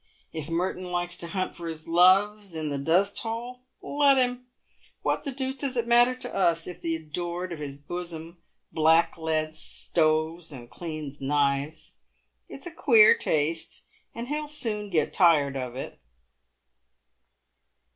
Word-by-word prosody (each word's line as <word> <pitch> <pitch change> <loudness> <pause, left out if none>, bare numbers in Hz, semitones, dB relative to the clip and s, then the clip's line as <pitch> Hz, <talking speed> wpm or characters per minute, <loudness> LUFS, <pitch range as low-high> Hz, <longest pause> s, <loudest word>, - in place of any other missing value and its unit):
If 160 -1 -6
Merton 180 +2 -2
likes 175 0 +1
to 170 - -2
hunt 185 +2 -4
for 170 -1 -8
his 160 -1 -6
loves 190 +3 +3
in 155 -1 -3
the 140 -1 -3
dusthole, 225 - 0 0.2
let 285 -1 +3
him. 250 -1 -1 0.6
What - - -1
the 280 - -3
deuce 265 0 -4
does 270 -2 +4
it 235 - 0
matter 240 +1 +4
to 255 - -8
us 170 -3 +1
if 180 0 -8
the 165 -1 -2
adored 175 +3 -4
of 160 - -8
his 140 -2 -7
bosom 170 +2 -3 0.3
blackleads 160 -1 +1
stoves 160 +1 0
and 120 -3 -9
cleans 155 -4 -7
knives? 140 +2 0 0.5
It's - - -9
a 350 - -6
queer 230 -9 +6
taste, 160 +2 +1 0.3
and 235 +1 -6
he'll 300 +2 -3
soon 220 -8 +3
get 160 -5 0
tired 150 -7 +3
of 125 -2 -5
it." 130 - -8
170 Hz, 145 wpm, -26 LUFS, 155-215 Hz, 0.6 s, queer